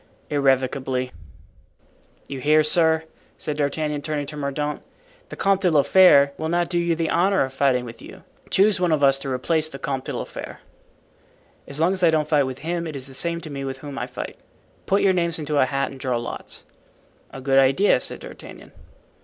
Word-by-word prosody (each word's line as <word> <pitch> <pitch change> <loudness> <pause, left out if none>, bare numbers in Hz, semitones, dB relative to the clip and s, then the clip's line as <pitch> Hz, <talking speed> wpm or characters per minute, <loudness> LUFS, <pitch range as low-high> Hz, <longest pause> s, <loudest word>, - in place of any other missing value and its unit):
"Irrevocably." 130 -2 0 1.2
"You 135 - -6
hear, 155 +3 +4
sir," 160 0 +3 0.3
said 150 - -3
D'Artagnan, 150 0 -1
turning 150 -1 -3
to 150 +2 -8
Mordaunt. 145 +1 -3 0.5
"The - - -7
Comte 195 0 +1
de 185 - +3
la 150 -4 +4
Fere 140 -7 +6
will 160 0 -2
not 175 0 0
do 175 - 0
you 170 -1 +1
the 165 0 -1
honor 190 +2 +3
of 130 0 -5
fighting 130 -2 +1
with 115 -1 -10
you. - - -12 0.3
Choose 200 0 +3
one 180 -2 +1
of 150 -2 +1
us 135 0 +4
to 135 0 -6
replace 155 +5 0
the 135 - -7
Comte 135 -1 -4
de - - -4
la - - -3
Fere." - - -9 1.1
"As 140 +1 -6
long 170 +4 +3
as 190 - -4
I 170 - +5
don't 155 -2 +1
fight 145 -3 +2
with 130 -1 -5
him 170 0 -2
it 155 - -6
is 130 -2 -5
the 135 - -10
same 170 +4 -2
to 155 - -9
me 140 -1 -5
with 135 -1 -4
whom 140 0 -7
I - - -3
fight. - - -7 0.5
Put 195 +1 +2
your 195 -1 +4
names 170 -2 +1
into 150 -2 -1
a 130 - +4
hat 135 +1 -1
and 135 - -11
draw 130 -3 -1
lots." 120 - -7 0.7
"A - - -9
good 135 0 +3
idea," 135 +10 +4
said - - -6
D'Artagnan. - - -11
150 Hz, 210 wpm, -23 LUFS, 135-170 Hz, 1.2 s, Fere